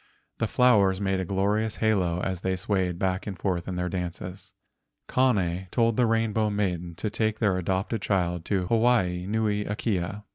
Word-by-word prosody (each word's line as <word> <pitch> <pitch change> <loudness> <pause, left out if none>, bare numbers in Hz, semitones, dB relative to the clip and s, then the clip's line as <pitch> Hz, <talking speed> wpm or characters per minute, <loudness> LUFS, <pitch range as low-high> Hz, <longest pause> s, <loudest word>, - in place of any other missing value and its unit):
The 115 - +1
flowers 105 -7 +4
made 95 -1 0
a 95 - -2
glorious 105 +4 0
halo 95 -6 +1
as 95 -1 -2
they 95 +1 -1
swayed 95 -3 -1
back 95 +1 -1
and 95 -3 -5
forth 90 -1 -2
in 95 - -3
their 90 0 -1
dances. 90 +1 -6 0.5
Kane 95 -8 +1
told 115 +1 +2
the 125 0 +3
Rainbow 110 -1 +1
Maiden 90 -5 -2
to 105 +4 -3
take 110 -1 0
their 105 -5 +2
adopted 95 +4 -1
child 90 -4 0
to 95 -3 0
Hawaii 95 -5 +2
nui 105 -1 0
akea. 100 -2 -2
95 Hz, 170 wpm, -26 LUFS, 90-110 Hz, 0.5 s, flowers